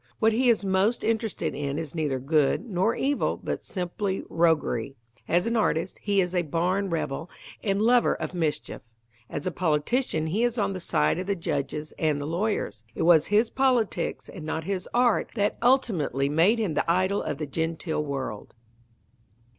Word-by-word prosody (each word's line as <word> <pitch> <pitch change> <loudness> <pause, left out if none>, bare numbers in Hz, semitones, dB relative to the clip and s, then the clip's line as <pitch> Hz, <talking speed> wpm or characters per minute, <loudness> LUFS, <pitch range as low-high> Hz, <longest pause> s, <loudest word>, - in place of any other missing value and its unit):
What 220 0 +3
he 250 +2 +3
is 220 -3 +3
most 195 +5 +2
interested 225 -2 -1
in 140 0 -3
is 160 -3 -4
neither 150 -5 -1
good 150 - +1
nor 195 +2 +1
evil 280 +1 0
but - - -4
simply 190 +1 -3
roguery. 155 -7 +1 0.3
As 175 +1 +2
an 230 +1 0
artist, 190 -5 0
he 200 -1 +2
is 180 0 -2
a 180 - +2
barn 180 +5 0
rebel 165 -1 -3 0.3
and 195 -2 +1
lover 240 +3 +4
of - - -5
mischief. 160 -4 -2 0.5
As 145 - -5
a 185 - 0
politician 160 - 0
he 195 +9 0
is 240 0 +1
on 200 -2 0
the 185 - -5
side 170 - +1
of 185 - -4
the 200 - +1
judges 150 -2 -3
and 155 -2 +1
the 145 - -4
lawyers. 170 - -2
It - - -1
was 165 -2 +5
his 215 +3 +3
politics 255 -5 0
and 180 - -9
not 160 +1 -3
his 185 +1 -3
art 240 -2 +2
that 205 -2 0
ultimately 210 - +2
made 170 +10 +4
him 210 -8 -1
the 155 - +1
idol 185 +3 +1
of 145 - -3
the 155 - -3
genteel 160 +2 -2
world. 135 -8 -5
180 Hz, 180 wpm, -26 LUFS, 155-215 Hz, 0.5 s, was